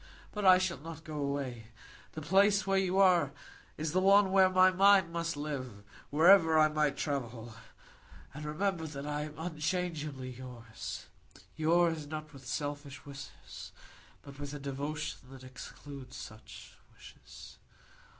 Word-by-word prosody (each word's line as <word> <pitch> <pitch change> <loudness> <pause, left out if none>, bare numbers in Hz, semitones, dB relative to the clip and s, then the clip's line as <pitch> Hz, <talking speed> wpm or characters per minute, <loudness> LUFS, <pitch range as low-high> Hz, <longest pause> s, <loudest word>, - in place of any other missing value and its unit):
But 210 -2 -3
I 185 -1 +9
shall 185 -2 -1
not 160 +1 -9
go 155 -1 -7
away. 140 -5 -3 0.5
The 155 - -6
place 200 +5 +4
where 195 0 +2
you 190 0 0
are 180 -7 +4 0.4
is 155 0 -2
the 185 - +2
one 195 0 +5
where 190 -1 +6
my 185 0 +5
mind 190 -2 +5
must 165 -2 -2
live, 130 -8 -5 0.3
wherever 160 +1 +6
I 155 0 +6
might 150 -2 0
travel. 120 -5 -4 0.8
And 150 +2 -8
remember 165 +2 -1
that 140 -2 -7
I 150 0 -2
am 155 0 -10
unchangeably 155 -5 -3
yours,—yours 145 +6 -3
not 155 0 -7
with 135 -2 -12
selfish 145 0 -5
wishes, 140 0 -10 0.5
but 140 0 -12
with 145 0 -5
a - - -6
devotion 140 +2 -4
that 135 -1 -12
excludes 130 +1 -10
such 110 0 -11 0.2
wishes. - - -14
150 Hz, 140 wpm, -32 LUFS, 140-175 Hz, 0.8 s, I